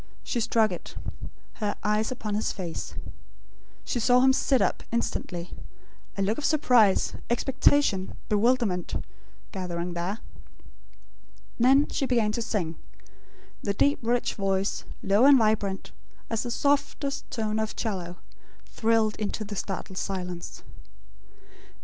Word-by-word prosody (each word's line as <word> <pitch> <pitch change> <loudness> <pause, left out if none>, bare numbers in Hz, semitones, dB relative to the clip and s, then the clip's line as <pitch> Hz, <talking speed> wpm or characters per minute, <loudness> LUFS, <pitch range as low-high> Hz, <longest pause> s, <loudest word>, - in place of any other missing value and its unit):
She 240 - -2
struck 225 -2 +2
it; 180 - -7 0.7
her 205 -1 0
eyes 210 +2 +1
upon 220 -4 -4
his 210 +1 0
face. 175 -4 -5 0.9
She 245 - -1
saw 245 +2 +5
him 265 0 +6
sit 265 0 +2
up, 200 - +1
instantly; 180 -6 -2 0.7
a 195 - +1
look 210 +6 0
of - - -6
surprise, 250 -10 +4 0.2
expectation, 260 -4 +2
bewilderment, 210 -4 +1 0.6
gathering 180 -2 -3
there. 175 +5 -2 1.4
Then 265 +4 +5
she 270 - -1
began 230 -4 +2
to 235 - -2
sing. 180 -8 -2 0.8
The 200 -1 -1
deep 285 +7 +3
rich 240 +1 0
voice, 195 0 -1 0.2
low 200 +5 +4
and 280 -1 +8
vibrant, 215 -4 0 0.4
as 225 -1 0
the 245 - -4
softest 280 +2 0
tone 220 -2 -1
of 220 0 -2
'cello, 180 -5 -3 0.5
thrilled 220 -1 +1
into 215 +1 -2
the 205 0 -6
startled 190 -1 -4
silence. 180 -3 -5
215 Hz, 125 wpm, -27 LUFS, 195-245 Hz, 1.4 s, and